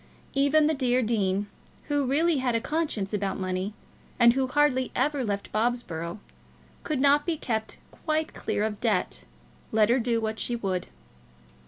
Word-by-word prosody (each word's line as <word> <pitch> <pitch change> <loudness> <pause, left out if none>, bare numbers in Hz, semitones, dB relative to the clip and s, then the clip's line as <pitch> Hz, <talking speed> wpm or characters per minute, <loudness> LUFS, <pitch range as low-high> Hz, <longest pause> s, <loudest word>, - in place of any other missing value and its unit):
Even 285 +3 +4
the 315 - +3
dear 255 -3 +1
dean, 205 -3 0 0.4
who 290 -2 0
really 315 +4 +2
had 255 -3 0
a - - +3
conscience 230 -8 -2
about 200 -1 -1
money, 185 +2 -2 0.4
and 235 -1 +6
who 265 0 0
hardly 260 -2 +2
ever 290 -2 +1
left 200 -3 -3
Bobsborough, 215 -7 -1 0.6
could 305 -5 -2
not 285 +2 +4
be 335 -1 -1
kept 220 -5 -3
quite 310 -1 -2
clear 210 - -2
of 215 -1 -3
debt, 215 -6 0 0.5
let 215 -1 +4
her 245 +3 +4
do 235 -1 +1
what 220 0 -3
she 240 - 0
would. 190 -5 -2
240 Hz, 160 wpm, -27 LUFS, 210-285 Hz, 0.6 s, and